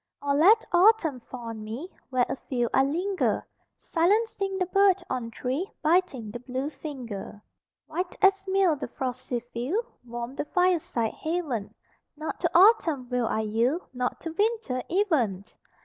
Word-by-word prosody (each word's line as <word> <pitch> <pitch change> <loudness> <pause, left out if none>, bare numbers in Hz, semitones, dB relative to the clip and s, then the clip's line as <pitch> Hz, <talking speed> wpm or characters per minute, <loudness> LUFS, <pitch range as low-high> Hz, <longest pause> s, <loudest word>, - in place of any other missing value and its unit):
Or 285 0 0
let 355 +10 +5
autumn 350 - +4
fall 245 +1 -10
on 220 -1 -6
me 230 +10 -6 0.2
Where 255 -2 +2
afield 245 -3 -2
I 265 - +5
linger, 360 +8 0 0.3
Silencing 390 +2 +1
the 370 - +1
bird 390 0 +3
on 250 -3 -2
tree, 265 - -3
Biting 305 - +1
the 240 - -6
blue 260 +4 -4
finger. 240 -11 -7 0.5
White 355 +3 -4
as 390 0 +4
meal 380 -4 +3
the 280 - -5
frosty 250 -1 -4
field 295 - -1 0.2
Warm 240 +1 -6
the 275 - -3
fireside 335 - +1
haven 315 - -3 0.4
Not 310 +1 -5
to 340 - +1
autumn 335 - +5
will 250 -2 0
I 220 - 0
yield, 230 - 0
Not 250 0 -2
to 330 - -4
winter 410 - 0
even! 275 - +1
295 Hz, 150 wpm, -27 LUFS, 245-370 Hz, 0.5 s, let